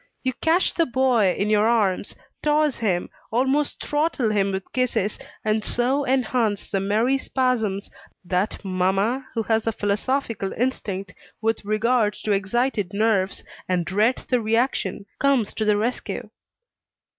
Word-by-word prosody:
You 260 Hz, 0 st, 0 dB
catch 335 Hz, +3 st, +2 dB
the 335 Hz, -, +2 dB
boy 245 Hz, -6 st, +3 dB
in 205 Hz, +2 st, 0 dB
your 210 Hz, +1 st, +4 dB
arms, 205 Hz, -5 st, +1 dB, 0.3 s
toss 300 Hz, -1 st, +2 dB
him, 190 Hz, -6 st, 0 dB, 0.2 s
almost 265 Hz, +5 st, +1 dB
throttle 295 Hz, -6 st, 0 dB
him 200 Hz, -2 st, +1 dB
with 190 Hz, 0 st, -2 dB
kisses, 230 Hz, -5 st, 0 dB, 0.3 s
and 215 Hz, 0 st, +1 dB
so 265 Hz, +5 st, 0 dB
enhance 245 Hz, -5 st, +1 dB
the 195 Hz, -, -1 dB
merry 220 Hz, +7 st, +2 dB
spasms, 230 Hz, -8 st, 0 dB, 0.4 s
that 185 Hz, +3 st, -1 dB
mamma, 195 Hz, +8 st, 0 dB
who 225 Hz, -, 0 dB
has 225 Hz, 0 st, 0 dB
a -, -, +3 dB
philosophical 210 Hz, 0 st, -1 dB
instinct 205 Hz, -6 st, -2 dB, 0.3 s
with 225 Hz, 0 st, 0 dB
regard 215 Hz, +1 st, +2 dB
to 215 Hz, -, 0 dB
excited 205 Hz, 0 st, 0 dB
nerves, 200 Hz, -2 st, +1 dB, 0.3 s
and 180 Hz, -2 st, +1 dB
dreads 210 Hz, +8 st, +1 dB
the 250 Hz, -2 st, +1 dB
reaction, 220 Hz, -3 st, 0 dB
comes 270 Hz, -6 st, +2 dB
to 220 Hz, -, -2 dB
the 210 Hz, -1 st, +3 dB
rescue. 235 Hz, +4 st, -3 dB
220 Hz, 140 wpm, -23 LUFS, 200-255 Hz, 0.4 s, your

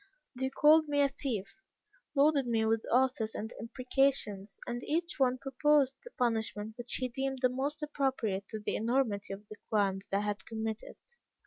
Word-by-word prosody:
"They 265 Hz, +1 st, -2 dB
called 310 Hz, +3 st, +5 dB
me 290 Hz, -1 st, 0 dB
a 280 Hz, -, +4 dB
thief, 255 Hz, -8 st, -3 dB, 0.7 s
loaded 280 Hz, -2 st, +4 dB
me 225 Hz, -2 st, +2 dB
with 225 Hz, 0 st, +1 dB
oaths 250 Hz, -3 st, +2 dB
and 220 Hz, +2 st, -4 dB
imprecations, 230 Hz, -5 st, 0 dB
and 240 Hz, 0 st, -3 dB
each 335 Hz, +3 st, -2 dB
one 255 Hz, -1 st, +3 dB
proposed 275 Hz, +1 st, +2 dB
the -, -, -10 dB
punishment 220 Hz, -3 st, -1 dB
which 240 Hz, 0 st, -3 dB
he 255 Hz, -, -1 dB
deemed 265 Hz, +2 st, -2 dB
the 255 Hz, -, +5 dB
most 285 Hz, +4 st, -2 dB
appropriate 260 Hz, -9 st, -1 dB
to 220 Hz, -, -4 dB
the 210 Hz, -, -2 dB
enormity 225 Hz, -4 st, 0 dB
of 200 Hz, +2 st, -8 dB
the 215 Hz, -, -10 dB
crime 200 Hz, -4 st, +2 dB
that 195 Hz, -, +1 dB
I -, -, +1 dB
had 205 Hz, -2 st, -2 dB
committed. 220 Hz, -1 st, -4 dB
245 Hz, 175 wpm, -32 LUFS, 215-275 Hz, 0.7 s, called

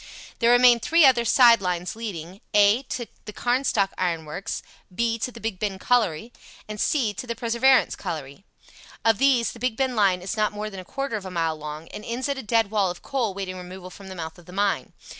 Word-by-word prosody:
There 235 Hz, -, +3 dB
remain 245 Hz, -1 st, +6 dB
three 325 Hz, +7 st, +4 dB
other 250 Hz, -3 st, +5 dB
side 235 Hz, -2 st, +6 dB
lines 180 Hz, -1 st, -2 dB
leading 195 Hz, -5 st, -7 dB
(a) 205 Hz, +4 st, +5 dB
To 240 Hz, -, -3 dB, 0.2 s
the 210 Hz, -, -6 dB
Carnstock 240 Hz, -5 st, +1 dB
Iron 170 Hz, -3 st, -1 dB
Works; 165 Hz, +6 st, -5 dB, 0.3 s
(b) 230 Hz, +4 st, -1 dB
To 250 Hz, -, -2 dB
the 235 Hz, -, -11 dB
Big 220 Hz, -5 st, -4 dB
Ben 200 Hz, -3 st, -2 dB
Colliery; 225 Hz, -1 st, 0 dB, 0.4 s
(c) 230 Hz, -1 st, +1 dB
To 250 Hz, -, -7 dB
the 235 Hz, -, -3 dB
Perseverance 240 Hz, +3 st, +3 dB
Colliery. 155 Hz, -3 st, -6 dB, 0.6 s
"Of 225 Hz, -2 st, +4 dB
these 265 Hz, -4 st, +3 dB
the 235 Hz, -, -12 dB
Big 245 Hz, -2 st, -1 dB
Ben 265 Hz, -2 st, 0 dB
line 190 Hz, -4 st, +2 dB
is 195 Hz, -, -3 dB
not 215 Hz, -1 st, +1 dB
more 210 Hz, +1 st, -5 dB
than 195 Hz, -, -8 dB
a 185 Hz, -, -9 dB
quarter 275 Hz, 0 st, -3 dB
of 195 Hz, -, -9 dB
a -, -, -5 dB
mile 165 Hz, -3 st, -1 dB
long, 150 Hz, +1 st, -8 dB
and 210 Hz, -, -8 dB
ends 240 Hz, +4 st, -3 dB
at 280 Hz, -1 st, -2 dB
a -, -, -4 dB
dead 225 Hz, -2 st, +1 dB
wall 205 Hz, -4 st, +2 dB
of 175 Hz, -, -7 dB
coal 240 Hz, -8 st, -2 dB
waiting 190 Hz, -2 st, -5 dB
removal 185 Hz, 0 st, -9 dB
from 195 Hz, +1 st, -12 dB
the 190 Hz, -, -8 dB
mouth 160 Hz, 0 st, -7 dB
of 175 Hz, -, -18 dB
the 180 Hz, -, -11 dB
mine. 200 Hz, 0 st, 0 dB
210 Hz, 220 wpm, -24 LUFS, 185-235 Hz, 0.6 s, remain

